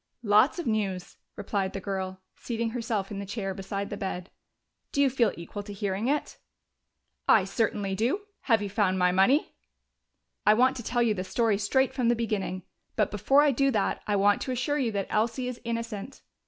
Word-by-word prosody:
"Lots 215 - +4
of 345 - -4
news," 195 -5 -2 0.2
replied 195 -2 -2
the 195 - -3
girl, 190 -1 -4
seating 230 -1 -3
herself 225 -5 -2
in 200 - -4
the - - -4
chair 195 -1 -3
beside 195 +1 -4
the 205 - -4
bed. 190 -2 -5 0.6
"Do - - -2
you 280 -2 +4
feel 240 -3 +2
equal 170 +4 -6
to 205 0 -8
hearing 200 +2 -2
it?" 290 +2 -1 0.9
"I 215 - +7
certainly 200 0 -1
do. 235 - 0 0.3
Have 225 -3 +4
you 200 - -3
found 190 -2 +2
my 180 -1 +3
money?" 195 - +3 0.9
"I 210 - +6
want 255 +3 +4
to 240 - -6
tell 240 +2 +1
you 225 -2 +2
the 185 -3 -3
story 210 +2 +1
straight 265 +6 +2
from 245 -3 +1
the 240 - +4
beginning. 200 -5 -2 0.3
But 210 -3 +1
before 270 +8 +4
I 295 - +4
do 275 +2 +2
that, 215 -6 0
I 205 - +1
want 205 +1 +3
to 260 - -3
assure 255 +4 0
you 245 -5 0
that 200 -2 -1
Elsie 230 +4 0
is 250 -1 -6
innocent. 230 0 -5
210 Hz, 195 wpm, -28 LUFS, 195-240 Hz, 0.9 s, I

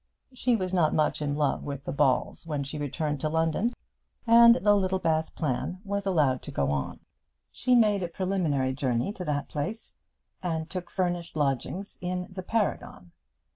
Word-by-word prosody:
She 250 -1 +1
was 185 -3 -2
not 165 -4 +3
much 155 0 +1
in 145 -1 -1
love 145 -2 0
with 140 -1 -5
the - - -4
Balls 140 +3 +1
when 150 -3 -2
she 140 +2 -6
returned 145 0 -2
to 155 - 0
London, 165 +8 +1 0.5
and 235 0 +8
the 205 -4 +3
Littlebath 185 -5 0
plan 155 +5 -2
was 200 -1 -3
allowed 145 -9 +2
to - - -8
go 70 0 0
on. 70 -2 -3 0.5
She 250 -1 +2
made 210 -4 +4
a 175 - -1
preliminary 165 -7 0
journey 130 - -1
to 185 -4 -6
that 145 -2 -1
place, 200 +10 -5 0.4
and 160 -3 -2
took 180 0 -6
furnished 175 -3 -2
lodgings 150 - -2
in 180 0 -2
the 185 0 -6
Paragon. 185 - -2
165 Hz, 170 wpm, -28 LUFS, 145-195 Hz, 0.5 s, and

